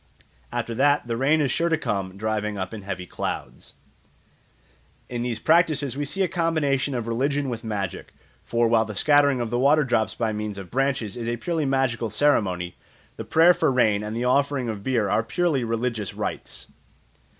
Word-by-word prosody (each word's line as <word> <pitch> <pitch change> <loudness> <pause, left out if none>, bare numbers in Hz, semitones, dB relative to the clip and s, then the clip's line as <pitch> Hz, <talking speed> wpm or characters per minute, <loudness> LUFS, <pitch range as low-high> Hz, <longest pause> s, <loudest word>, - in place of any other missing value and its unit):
After 115 - -3
that 145 +4 +3
the 115 -1 -2
rain 145 +6 +2
is 135 -4 +1
sure 170 +4 +1
to 160 - +2
come 100 -8 -3
driving 105 0 -2
up 95 +2 -4
in 110 - -6
heavy 95 -2 -5
clouds. - - -6 1.4
In 120 -1 -3
these 120 -2 -2
practices 155 -5 +2
we 145 +1 -2
see 195 +7 0
a - - +2
combination 155 -6 0
of 120 -2 -2
religion 135 +4 0
with 115 -1 -5
magic; 100 -4 -4 0.3
for 115 0 +1
while 115 -1 +4
the 110 -2 -7
scattering 145 +2 +4
of 120 -2 -3
the 120 - 0
water 145 +4 +4
drops 110 -5 0
by 110 -2 -1
means 105 -1 -4
of 95 -3 -9
branches 130 -5 0
is 120 -1 -4
a 120 - -1
purely 165 +3 -1
magical 130 -4 0
ceremony, 95 -11 +1 0.4
the - - -5
prayer 165 +2 +6
for 140 - +1
rain 110 -5 +3
and 105 +2 -4
the 120 - -1
offering 140 -1 +1
of 105 -3 -4
beer 120 -5 +1
are 110 - +2
purely 150 +3 0
religious 115 -3 -2
rites. - - -4
120 Hz, 185 wpm, -24 LUFS, 110-145 Hz, 1.4 s, prayer